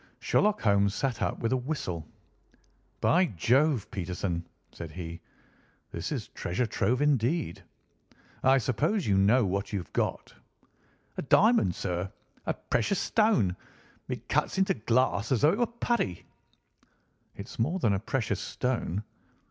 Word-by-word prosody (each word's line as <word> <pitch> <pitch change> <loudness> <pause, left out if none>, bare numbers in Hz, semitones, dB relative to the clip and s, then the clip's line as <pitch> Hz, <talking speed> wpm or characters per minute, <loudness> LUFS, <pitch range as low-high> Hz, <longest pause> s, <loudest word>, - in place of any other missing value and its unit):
Sherlock 210 0 +2
Holmes 100 -2 +3
sat 135 -4 -1
up - - 0
with 115 - 0
a - - +3
whistle. 120 - -4 0.9
"By 180 +2 +4
Jove, 125 - +2
Peterson!" 90 -2 -3 0.2
said 85 -2 -8
he, 85 -1 -7 0.7
"this - - -4
is - - -3
treasure 90 +8 -2
trove 125 +4 +1
indeed. 140 - +1 0.8
I 135 +1 +6
suppose 145 - 0
you 100 - +2
know 105 +5 +4
what 100 +1 -2
you 105 - -1
have 90 - -7
got?" - - -2 0.8
"A - - -1
diamond, 200 - +4
sir? 90 +1 -3 0.4
A - - +2
precious 150 - 0
stone. 175 - +2 0.5
It - - -5
cuts - - 0
into 190 0 +3
glass 115 -2 +1
as 125 - +2
though 150 - +6
it 205 - -2
were 240 - +3
putty." 235 - -2 1.1
"It's 100 +4 -9
more 155 +11 +1
than 115 - +2
a 95 - 0
precious 110 -3 -1
stone. 110 -3 -2
115 Hz, 140 wpm, -29 LUFS, 95-145 Hz, 1.1 s, I